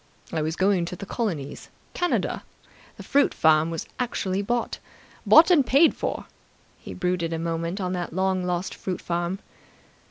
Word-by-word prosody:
I 160 - 0
was 160 +1 -1
going 190 -2 +2
to 175 - -5
the 200 - -8
colonies. 175 - -4 0.2
Canada. 355 -1 0 0.6
The - - -9
fruit 285 0 +2
farm 160 0 +4
was 165 -2 -4
actually 200 -6 -1
bought. 240 +3 -2 0.5
Bought 325 +3 +8
and 315 -6 +6
paid 275 +6 +5
for!" - - -3 0.5
He - - -9
brooded 180 -2 -1
a - - -1
moment 165 +3 -2
on 185 -1 -2
that 175 -1 -3
long 185 +1 0
lost 180 0 -2
fruit 185 -2 -4
farm. 175 +2 -2
180 Hz, 160 wpm, -25 LUFS, 165-205 Hz, 0.6 s, Bought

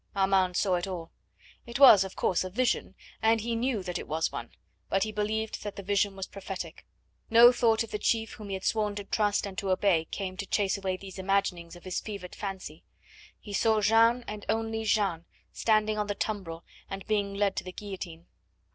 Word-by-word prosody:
Armand 190 -2 +2
saw 190 -3 +2
it 175 - -3
all. 170 -3 -6 0.6
It 235 - -4
was, 225 -8 +9
of 190 - -8
course, 185 - +1
a 185 - -5
vision, 250 +6 0 0.3
and 225 0 +4
he 230 +2 -2
knew 230 -3 -1
that 180 -1 -3
it - - -8
was 160 +1 0
one, - - -6 0.4
but 195 0 +2
he 215 - -3
believed 215 +1 -2
that 205 -1 -6
the 200 - -7
vision 200 0 +1
was 195 -1 -4
prophetic. 195 -1 -7 0.4
No 235 +2 +9
thought 230 -2 +2
of 225 - -10
the 210 - -3
chief 225 +1 +1
whom 210 - -9
he 195 - -2
had 190 - -7
sworn 210 -2 0
to 205 - -4
trust 205 0 +1
and 195 -1 -7
to 195 - -3
obey 185 -3 +2
came 185 +1 -5
to 200 - -4
chase 200 -1 +1
away 190 -2 -2
these 190 0 -10
imaginings 185 -3 -1
of 175 - -14
his 185 -1 -2
fevered 200 -4 -7
fancy. 190 -6 -6 0.6
He 205 - -9
saw 220 +1 +3
Jeanne, 225 +4 +4
and 210 -1 -6
only 225 0 -1
Jeanne, 195 -6 +1 0.3
standing 215 -1 +2
on 210 - -1
the 205 - -2
tumbril 185 -7 -4 0.3
and 195 -1 -6
being 205 -2 0
led 200 -1 +1
to - - -1
the 185 - -7
guillotine. 180 -4 -8
200 Hz, 210 wpm, -29 LUFS, 190-220 Hz, 0.6 s, was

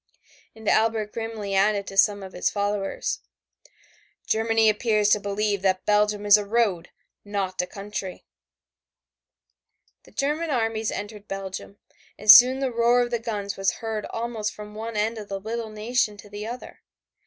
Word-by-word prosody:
And 220 -1 -11
Albert 220 -1 +2
grimly 225 -3 -4
added 200 +1 +2
to 195 - -8
some 200 0 +3
of 190 - -9
his 180 - 0
followers, 205 -1 -2 1.1
"Germany 225 0 +2
appears 215 -1 +2
to 210 - +4
believe 205 0 -1
that 185 -1 0
Belgium 210 0 +2
is 205 0 +8
a 210 - -2
road, 200 -5 0 0.3
not 195 -3 -2
a 180 - -5
country." 195 -1 -7 1.8
The - - -18
German 300 +4 -1
armies 225 -4 0
entered 205 0 -6
Belgium, 195 0 -6 0.4
and 210 0 +8
soon 255 +2 +8
the 265 -2 0
roar 235 +1 +3
of 240 0 -2
the 235 - 0
guns 205 -3 -4
was 195 -1 +1
heard 220 -2 -4
almost 225 -2 -4
from 210 0 -10
one 220 +1 -5
end 220 +2 0
of 210 - -9
the 195 -1 -3
little 225 +2 -4
nation 215 0 -1
to 205 - -13
the 205 +1 -6
other. 245 +2 -8
210 Hz, 160 wpm, -25 LUFS, 200-225 Hz, 1.8 s, is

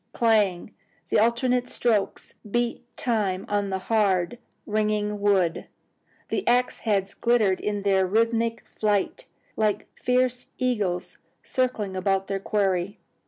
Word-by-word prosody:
clang! 210 -5 +2 0.4
the - - +3
alternate 245 +2 +2
strokes 220 -5 0 0.2
beat 240 +2 -1
time 205 -6 0
upon 205 -1 -1
the 190 - -1
hard, 200 0 +1 0.3
ringing 210 -1 0
wood. 190 -5 +2 0.6
The 390 - -1
axe 245 +1 +2
heads 200 -3 0
glittered 220 -6 +2
in 205 -1 -2
their 190 -2 +3
rhythmic 230 +2 +1
flight, 210 -2 -1 0.3
like 215 -2 0
fierce 250 0 0
eagles 210 -9 -1 0.2
circling 235 -7 -1
about 195 +1 +1
their 195 0 -2
quarry. 195 -1 0
210 Hz, 115 wpm, -25 LUFS, 195-235 Hz, 0.6 s, the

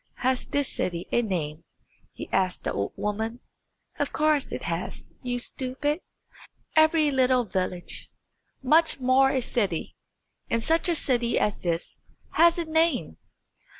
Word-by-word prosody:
"Has 255 0 0
this 285 -2 0
city 175 -1 -3
a 240 - +3
name?" 165 -7 -3 0.5
he - - -8
asked 185 -1 0
the - - -2
old 100 0 -2
woman. 220 +3 -3 0.6
"Of - - 0
course 305 -2 +1
it - - -5
has, - - -4
you 245 -1 -2
stupid. 270 +6 -2 0.7
Every 315 -1 +5
little 255 -2 +3
village, 185 -3 -2 0.5
much 315 +3 +4
more 260 +1 +4
a 265 -1 +1
city, 205 -9 -2 0.5
and 230 0 0
such 325 +6 +2
a 340 - +3
city 240 -5 +1
as 210 - +1
this, 170 -1 -3 0.3
has 335 +2 +5
a 340 - -1
name." 320 +1 +1
255 Hz, 140 wpm, -26 LUFS, 210-300 Hz, 0.7 s, Every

